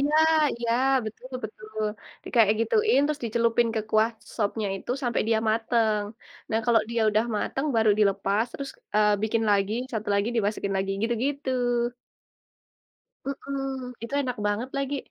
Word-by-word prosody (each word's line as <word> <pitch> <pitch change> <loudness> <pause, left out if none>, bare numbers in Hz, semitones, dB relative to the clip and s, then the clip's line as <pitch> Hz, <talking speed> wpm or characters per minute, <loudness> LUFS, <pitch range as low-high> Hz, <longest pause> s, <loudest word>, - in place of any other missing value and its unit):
Iya 290 +2 +2 0.4
iya, 235 -1 0 0.3
betul 235 +4 -8 0.2
betul. 215 0 -9 0.5
Dikayak 220 -3 +4
gituin 430 - +3
terus 300 -1 -2
dicelupin 230 +1 +2
ke 220 - +1
kuah 220 +2 +3 0.2
sopnya 210 -1 -1
itu 195 - -7
sampai 240 -3 0
dia 225 - +3
matang. 220 -2 +1 0.5
Nah 220 - +2
kalau 235 -2 +5
dia 235 0 0
udah 215 +1 +2
matang, 270 +7 -2
baru 220 -1 +4
dilepas, 200 +1 +2
terus, 275 -1 -5 0.3
eee, 210 0 +5
bikin 220 +1 +1
lagi, 200 +1 +2 0.2
1 220 -2 -3
lagi 200 +3 +1
dimasukin 205 -2 0
lagi, 195 0 -1
gitu-gitu. 260 +5 -1 1.7
Mhm, 270 -2 -4
itu 230 - -7
enak 255 -3 -2
banget 205 +5 -1
lagi. 275 +1 -1
225 Hz, 145 wpm, -26 LUFS, 215-255 Hz, 1.7 s, kalau